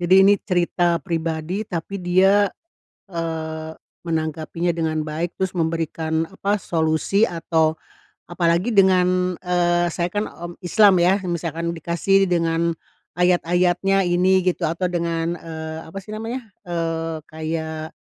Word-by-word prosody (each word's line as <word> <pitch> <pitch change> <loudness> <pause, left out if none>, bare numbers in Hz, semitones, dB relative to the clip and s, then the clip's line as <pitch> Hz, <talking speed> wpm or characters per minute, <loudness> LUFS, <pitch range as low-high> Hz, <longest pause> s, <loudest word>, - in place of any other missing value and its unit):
Jadi 180 +2 +4
ini 200 +1 +6
cerita 175 -2 +1
pribadi, 165 +3 -2
tapi 180 +2 -5
dia, 190 +3 +3 0.6
eee, 160 -2 -4 0.3
menanggapinya 160 +1 -2
dengan 160 -2 -1
baik 160 +3 -4
terus 190 -1 -1
memberikan 160 -1 -1
apa, 200 +3 -1
solusi 160 +3 0
atau 160 -4 +1 0.5
apalagi 175 +4 +1
dengan 185 -3 +3
eee, 175 -1 +2
saya, 170 +1 -1
kan, 205 +1 -1
mmm, 175 +2 -9
Islam, 195 0 +5
ya. 185 +3 +4
Misalkan 170 -1 -2
dikasih 175 +4 +1
dengan 165 -1 +1 0.4
ayat-ayatnya 180 +2 +2
ini, 185 +1 +3
gitu 180 -1 +1
atau 170 +3 -2
dengan, 170 -1 -1
eee, 160 -1 -6
apa, 180 - -9
sih 210 +2 -10
namanya, 230 +3 -5 0.2
eee, 165 -1 -2
kayak 160 0 -4
170 Hz, 125 wpm, -22 LUFS, 165-185 Hz, 0.6 s, ini